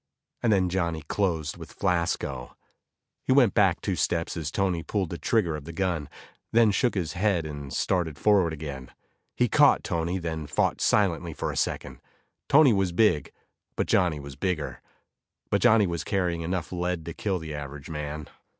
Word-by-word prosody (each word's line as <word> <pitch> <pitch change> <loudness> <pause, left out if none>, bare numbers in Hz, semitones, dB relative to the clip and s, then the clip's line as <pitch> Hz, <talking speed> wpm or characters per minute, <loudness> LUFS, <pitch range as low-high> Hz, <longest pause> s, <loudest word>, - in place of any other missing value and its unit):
And 115 - +2
then 95 -3 +3
Johnny 85 -3 -1
closed 80 -3 -1
with - - -11
Flasco. 75 -7 -1 0.7
He - - -1
went 130 -6 +5
back 95 -5 +3
two 95 - -1
steps 85 -1 -1
as 80 -3 -3
Tony 90 0 0
pulled 95 0 -2
the 85 - -5
trigger 95 -9 +1
of 75 -2 -8
the 85 - -7
gun, 85 -5 -2 0.4
then 115 -2 +5
shook 120 +3 +1
his 85 -5 -2
head 95 -3 +1
and 70 -2 -7
started 85 -6 0
forward 100 -4 +3
again. 70 -4 -7 0.5
He 125 - +2
caught 145 +2 +5
Tony, 85 +1 -1
and 90 - -7
they 80 -3 -4
fought - - +1
silently 85 -5 +1
for - - -2
a - - -7
second. - - -2 0.5
Tony 140 -3 +7
was 95 -3 +1
big, 85 -6 +2 0.4
but - - 0
Johnny 85 -5 +2
was 70 -1 -9
bigger. 80 -1 -3 0.7
But - - +2
Johnny 115 -3 +5
was 85 -4 -3
carrying 90 -3 -1
enough 85 0 -3
lead 90 -2 -2
to 85 - -5
kill 95 +1 -1
the 80 -3 -7
average 70 -1 -7
man. 75 0 -5
85 Hz, 175 wpm, -27 LUFS, 80-95 Hz, 0.7 s, Tony